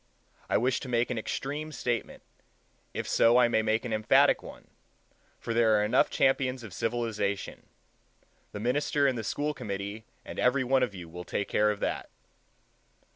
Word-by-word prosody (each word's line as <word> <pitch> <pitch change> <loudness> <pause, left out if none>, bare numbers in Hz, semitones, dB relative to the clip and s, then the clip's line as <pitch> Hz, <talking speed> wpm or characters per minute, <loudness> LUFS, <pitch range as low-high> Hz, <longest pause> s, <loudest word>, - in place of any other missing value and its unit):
I - - +3
wish 125 +3 +1
to 130 - -8
make 120 0 +1
an 120 - -1
extreme 145 +7 -4
statement, 120 -5 -3 0.7
if - - -4
so 115 +1 +4
I 125 -1 +6
may 110 -2 +2
make 110 +2 0
an 115 - -3
emphatic 110 0 +4
one, - - -12 0.7
for 115 - -4
there 115 -2 +4
are 105 - +2
enough 115 +5 +3
champions 130 -2 +1
of 105 -5 -9
civilization: 110 -1 -2 0.8
the 105 - -6
minister 140 +5 +1
and 135 -2 +2
the 115 - -4
school 145 +7 -2
committee 100 -1 -5 0.2
and - - -7
every 130 +1 +3
one 130 +1 +2
of 120 -6 -1
you 90 -2 -8
will 90 +2 -8
take 100 +2 -3
care 105 0 +3
of 105 -1 -3
that. - - -2
115 Hz, 175 wpm, -29 LUFS, 105-130 Hz, 0.8 s, I